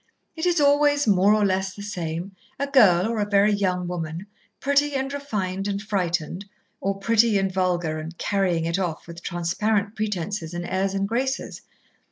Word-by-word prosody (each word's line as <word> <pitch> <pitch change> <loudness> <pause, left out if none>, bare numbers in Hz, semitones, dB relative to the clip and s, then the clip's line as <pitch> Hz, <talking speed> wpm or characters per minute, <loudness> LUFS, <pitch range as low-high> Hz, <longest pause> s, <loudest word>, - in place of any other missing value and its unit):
It 320 +2 -1
is 350 -2 +2
always 290 0 +4
more 200 -1 +4
or 210 -1 +2
less 190 0 0
the 205 - -8
same, 175 -1 -4 0.2
a 280 - -1
girl 215 -10 +5
or 230 -1 -2
a 205 0 -1
very 205 +1 +4
young 180 -3 0
woman, 170 0 -4 0.3
pretty 285 +1 +2
and 270 +1 -2
refined 200 -9 -3
and 200 -1 -1
frightened, 180 -3 -2 0.4
or 195 +1 -1
pretty 225 +1 +3
and 195 -1 0
vulgar 175 -4 0
and 160 +2 -8
'carrying 185 -5 0
it 170 +3 -1
off' 170 -4 -3
with 170 0 -10
transparent 200 +6 -1
pretences 200 -4 -3
and 175 0 -4
airs 190 +2 -1
and 195 0 0
graces. 265 +5 -2
195 Hz, 175 wpm, -24 LUFS, 175-220 Hz, 0.4 s, girl